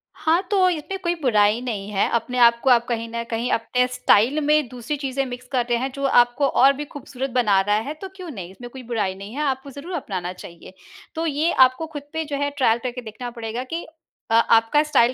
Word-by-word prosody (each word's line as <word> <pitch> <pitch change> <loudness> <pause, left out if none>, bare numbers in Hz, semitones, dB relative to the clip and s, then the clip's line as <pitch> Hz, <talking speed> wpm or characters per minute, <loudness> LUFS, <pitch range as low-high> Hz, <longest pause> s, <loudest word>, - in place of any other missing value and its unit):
हाँ, 320 +3 +2
तो 380 -2 +4
इसमें 355 +3 -3
कोई 345 0 0
बुराई 215 -2 +3
नहीं 210 -5 -4
है, 200 -1 +1
अपने 235 +2 -1
आपको 235 +2 +5
आप 235 -1 +5
कहीं 230 -1 -2
न 235 0 -4
कहीं 230 +2 -2
अपने 250 +2 +1
स्टाइल 250 +9 +3
में 300 -2 +3
दूसरी 250 +4 -4
चीज़ें 275 -1 -2
मिक्स 250 0 -8
कर 250 -3 +1
रहे 240 - +2
हैं 265 +2 -2
जो 275 - -5
आपको 245 +1 +4
और 270 +1 +5
भी 295 +2 -6
खूबसूरत 270 -2 -6
बना 205 -5 +3
रहा 205 +1 +1
है, 225 +8 -2
तो 380 +5 -8
क्यों 365 -3 -8
नहीं, 185 -8 -8
इसमें 240 +5 -10
कोई 260 0 -10
बुराई 215 -5 -2
नहीं 200 +4 -9
है, 300 - -2
आपको 270 -1 -2
ज़रूर 295 +7 -8
अपनाना 185 - -4
चाहिए। 175 0 -12 0.4
तो 325 +1 -2
ये 310 +2 +1
आपको 260 +5 +4
खुद 290 -2 -6
पे 320 0 -2
जो 285 -1 -4
है 285 - +1
ट्रायल 235 -3 +3
करके 250 0 -4
देखना 235 +2 -7
पड़ेगा 230 +1 -5
कि 335 - -3 0.5
अ, - - +2
आपका 230 +4 +4
स्टाइल 260 -5 +3
250 Hz, 225 wpm, -22 LUFS, 230-285 Hz, 0.5 s, आपको